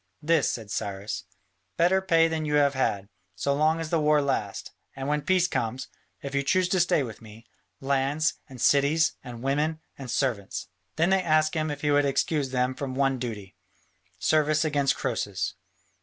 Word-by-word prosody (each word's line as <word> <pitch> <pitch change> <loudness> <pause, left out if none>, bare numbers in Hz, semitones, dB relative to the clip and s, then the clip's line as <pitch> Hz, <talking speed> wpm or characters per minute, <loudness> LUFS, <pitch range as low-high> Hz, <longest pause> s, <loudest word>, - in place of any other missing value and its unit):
"This," 160 -2 +3
said 110 -4 -6
Cyrus: 100 0 -4 0.5
"better 180 +3 +3
pay 165 -3 +4
than 160 -1 -2
you 150 -1 0
have 145 -1 +4
had, 100 -7 -1 0.3
so 140 - 0
long 155 +3 +2
as 165 -1 -5
the 165 - +2
war 150 0 +4
lasts, 140 -1 -2 0.2
and 135 0 -5
when 150 0 0
peace 185 +2 +2
comes, 125 -2 -3 0.3
if 140 0 -5
you 140 - +2
choose 185 +6 +2
to 185 - +2
stay 165 -4 +3
with 115 -4 -8
me, 110 +1 -13 0.4
lands 140 +3 +1 0.2
and 130 -2 -11
cities 145 +6 +3
and 120 -2 -9
women 150 +4 0 0.2
and 130 -2 -7
servants." 120 -6 -2 0.3
Then 165 +4 +2
they 190 -1 +4
asked 155 -2 +2
him 155 -1 -1
if 145 -1 -5
he 150 - +1
would 145 0 +4
excuse 140 +1 0
them 125 0 0
from 130 -1 -5
one 135 -1 +1
duty, 110 -6 -6 0.6
service 155 0 +2
against 145 -3 +1
Croesus. - - -2
145 Hz, 180 wpm, -26 LUFS, 130-155 Hz, 0.6 s, pay